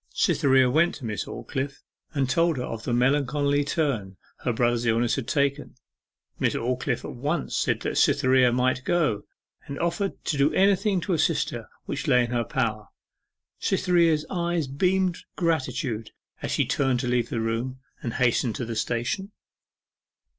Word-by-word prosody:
Cytherea 130 -2 +4
went 160 +7 +3
to 125 - -8
Miss 105 -2 -3
Aldclyffe, 135 +4 -5 0.3
and 135 -2 +1
told 165 +3 +2
her 125 - -2
of 115 -2 -6
the - - -1
melancholy 140 +3 +2
turn 130 - -1 0.2
her 125 - -1
brother's 120 0 +1
illness 115 +1 +2
had 135 -4 -2
taken. 140 0 0 0.6
Miss - - +1
Aldclyffe 125 0 -1
at - - -6
once 145 +7 -2
said - - 0
that - - -1
Cytherea 130 -1 +4
might 130 +1 +1
go, 150 -13 +1 0.4
and 140 - -5
offered 170 +3 -1
to 145 - 0
do 140 +3 +4
anything 195 0 +3
to 180 +2 -1
assist 160 - +1
her - - -7 0.2
which - - -4
lay 125 - +5
in 120 - -4
her 120 -1 +1
power. 110 -5 -2 0.7
Cytherea's 165 -4 +2
eyes 175 -3 0
beamed 180 +6 +1 0.2
gratitude 130 - -1 0.3
as - - -3
she - - +1
turned 135 -3 +1
to 125 - -3
leave 120 -1 +1
the 115 - -2
room, 115 +4 -2 0.2
and 115 - -4
hasten 120 -1 +2
to 125 - -4
the 115 0 -4
station. 120 - -2
130 Hz, 160 wpm, -26 LUFS, 120-160 Hz, 0.7 s, lay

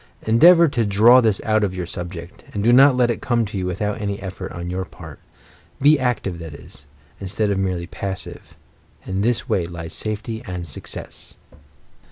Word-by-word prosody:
Endeavour 170 +10 +6
to 125 -5 0
draw 110 +5 +6
this 110 -4 +1
out 110 -1 +2
of 95 -2 -1
your 90 -1 -3
subject, 85 0 -8
and 100 - -1
do 120 +2 +4
not 135 +1 +7
let 120 -1 +3
it 115 - -5
come 120 -2 +1
to 105 - -8
you 95 -2 -2
without 105 +4 -3
any 100 -1 -3
effort 95 -1 -7
on 85 0 -6
your 95 +1 -2
part. 85 -5 -12 0.6
Be 145 +2 +5
active, 115 -8 -2
that 80 -3 -8
is, 70 0 -12 0.3
instead 100 +2 -1
of 95 - 0
merely 90 -3 -2
passive. 95 +1 -6 0.5
In 95 +1 -2
this 120 +3 0
way 85 -3 0
lies 80 -1 -7
safety 110 +1 -3
and 90 -2 -5
success. - - -7
100 Hz, 185 wpm, -21 LUFS, 90-115 Hz, 0.6 s, not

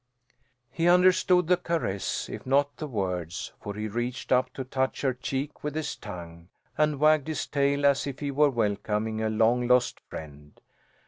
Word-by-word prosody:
He 165 +4 0
understood 180 0 +5
the 180 +2 +3
caress, 165 - -2
if - - -7
not 140 +2 +2
the 155 - -5
words, 90 - -3
for 100 -2 -6
he 105 +1 -3
reached 120 +4 -4
up 130 0 +3
to 135 - -3
touch 130 +1 -2
her 135 -2 +2
cheek 135 +3 -4
with 150 0 -3
his 155 -1 -2
tongue, 85 -1 -9 0.3
and 150 -2 +1
wagged 155 -1 +4
his 155 - -2
tail 140 0 +1
as 140 0 +3
if 135 -2 -5
he 145 -1 -3
were 145 +1 +4
welcoming 110 -1 -1
a 110 - 0
long 115 +3 +2
lost 125 0 +3
friend. 75 -1 -10
130 Hz, 175 wpm, -27 LUFS, 110-150 Hz, 0.3 s, understood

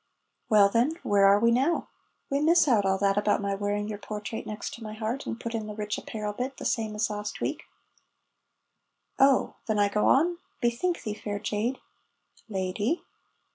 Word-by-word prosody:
("Well, 210 -3 +7
then, 235 +9 +2
where 200 -1 +4
are 200 +1 +6
we 230 +2 +4
now?") 270 +8 +1 0.4
("We 280 - 0
miss 330 +2 +4
out 215 -7 +3
all 190 0 +2
that 200 +1 +2
about 205 0 +2
my 200 -1 -1
wearing 205 +1 -1
your 210 -1 -5
portrait 210 +1 -6
next 215 +2 -6
my 215 -1 -6
heart, 225 +5 -3
and 225 - -4
put 230 -1 -5
in 220 -2 -3
the 210 - -6
rich 210 -1 -2
apparel 210 -1 -5
bit, 255 +4 -4
the - - -7
same 220 -2 -1
as 215 +1 0
last 210 0 -5
week.") - - -3 1.5
("Oh! 270 0 +4
Then 215 -2 +1
I 205 -1 +3
go 210 +1 +1
on?) 340 +5 +3 0.2
Bethink 245 +9 0
thee, 215 -3 -3
fair 210 -1 -4
jade 220 +5 -2 0.4
" - - -32
("Lady.") 205 - -1
215 Hz, 185 wpm, -27 LUFS, 205-245 Hz, 1.5 s, Well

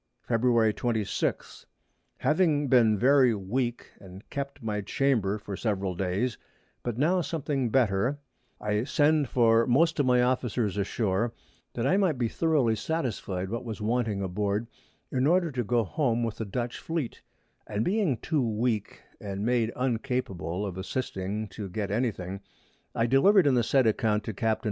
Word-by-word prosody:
Feb. 115 -2 +3
26. 110 -4 -2 0.5
Having 150 -3 +2
been 115 -4 +5
very 130 +1 +4
weak, 120 +5 -3
and 95 +1 -13
kept 140 -2 -5
my 105 -2 -2
Chamber 105 -2 +1
for 100 -1 -7
several 100 -3 -1
Days, 95 +7 -1 0.4
but 120 -2 -4
now 175 +7 +2
something 145 -6 -2
better, 120 +2 +2 0.4
I 105 +1 0
sent 150 +1 +2
for 115 -2 +4
most 160 +6 +3
of 140 - +2
my 125 -1 +4
Officers 120 -4 0
ashore, 105 +2 -1 0.4
that 115 - -1
I 185 +8 +3
might 185 -8 +2
be 120 -2 +1
thoroughly 140 -5 +1
satisfied 105 - -3
what 115 - -3
was 115 -3 -6
wanting 110 -2 0
aboard, 100 +3 -1 0.5
in 130 +1 +1
order 175 0 +3
to 125 -2 -2
go 120 +1 +1
home 120 +1 0
with 115 -1 -3
the 110 - -3
Dutch 120 +4 -4
Fleet; 160 -7 -4 0.5
and 105 +1 -1
being 190 - +1
too 155 +2 -1
weak, 110 -2 -1 0.2
and 100 +1 -4
made 120 -2 +1
uncapable 120 -7 -2
of 95 -2 -5
assisting 105 -1 -3
to 100 0 -7
get 100 +2 -3
any 120 +4 +1
thing, 95 -1 -7 0.5
I 115 - +2
deliver'd 170 - +5
in 140 - +4
the 125 - +3
said 130 +2 +2
Account 110 -1 +1
to 110 - -5
Capts. 110 +1 0
115 Hz, 160 wpm, -28 LUFS, 105-130 Hz, 0.5 s, been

